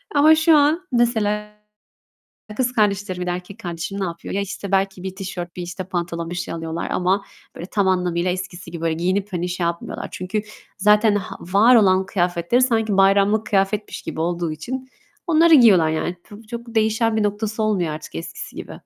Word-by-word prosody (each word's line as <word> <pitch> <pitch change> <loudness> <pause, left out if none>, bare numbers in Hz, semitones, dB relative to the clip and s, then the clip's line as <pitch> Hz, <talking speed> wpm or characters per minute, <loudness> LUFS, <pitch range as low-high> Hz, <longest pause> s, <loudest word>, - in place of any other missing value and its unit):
Ama 310 +2 +7
şu 315 0 +5
an 315 +6 +2
mesela, 235 -3 +2 1.2
e, 210 - -8
kız 250 +1 0
kardeşlerim 200 -4 0
ya 180 - -3
da - - 0
erkek 180 +4 -7
kardeşim 175 +1 -5
ne 195 - 0
yapıyor? 170 -1 -6
Ya, 200 - 0
işte 200 0 -6
belki 195 -1 0
bir 190 0 -5
tişört 180 -3 -6
bir 180 - -5
işte 180 +2 -6
pantolon 170 -2 -4
bir 175 - -5
şey 175 - -4
alıyorlar 165 0 -4
ama 190 +2 +1 0.3
böyle 170 - -7
tam 200 -2 0
anlamıyla 180 -1 +1
eskisi 185 -1 -6
gibi 170 -1 -7
böyle 165 -1 0
giyinip 185 +4 0
hani 175 0 -2
şey 180 0 -3
yapmıyorlar. 170 0 -3
Çünkü 185 +4 -3 0.4
zaten 210 +1 +4
h 205 - -4 0.2
var 230 +5 +6
olan 190 -3 +4
kıyafetleri 175 +4 0
sanki 225 -5 +1
bayramlık 200 +2 +4
kıyafetmiş 200 +1 -1
gibi 160 - -5
olduğu 170 -1 -1
için 255 +12 -6 0.4
onları 330 0 +5
giyiyorlar. 200 - +6
Yani, 160 +3 -2
p 205 +2 -13
çok 235 +1 -8
değişen 220 +1 +2
bir 215 - +2
noktası 215 +1 -2
olmuyor 195 -6 +1
artık 155 - -9
eskisi 80 - -7
gibi. - - -7
195 Hz, 190 wpm, -21 LUFS, 175-220 Hz, 1.2 s, Ama